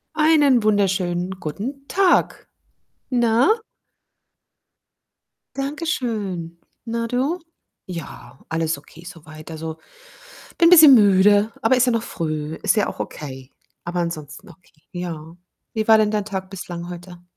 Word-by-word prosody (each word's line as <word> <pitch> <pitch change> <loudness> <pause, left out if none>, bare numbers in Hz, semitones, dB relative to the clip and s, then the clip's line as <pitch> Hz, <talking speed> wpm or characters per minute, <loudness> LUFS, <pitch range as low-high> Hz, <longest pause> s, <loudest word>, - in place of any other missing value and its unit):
Einen 300 -5 +4
wunderschönen 190 -3 0
guten 255 - -6
Tag. 385 -2 +1 0.6
Na? 240 - +3 2.0
Danke 285 +4 -4
schön. 200 - -3 0.3
Na, 230 0 -2
du? 265 +9 -1 0.5
Ja, 165 -7 -9
alles 160 -1 -1
okay 155 +3 -16
so 170 -3 -11
weit. 155 +1 -11
Also, 160 0 -6 0.8
bin 335 0 +6
bisschen 310 -6 +9
müde, 205 0 +4
aber 225 +4 +3
ist 255 - +4
ja 250 - +2
noch 230 -1 0
früh. 155 -5 -4
Ist - - +3
ja 210 - +1
auch - - -7
okay. 130 -3 -7 0.3
Aber 175 +1 -3
ansonsten 170 +2 -5
okay, 165 -2 -21
ja. 165 -2 -7 0.4
Wie 220 -1 -2
war 220 -1 +7
denn 215 -1 +2
dein 210 -2 -1
Tag 190 -2 -5
bislang 175 -2 -7
heute? 175 0 -10
190 Hz, 130 wpm, -21 LUFS, 165-235 Hz, 2.0 s, bisschen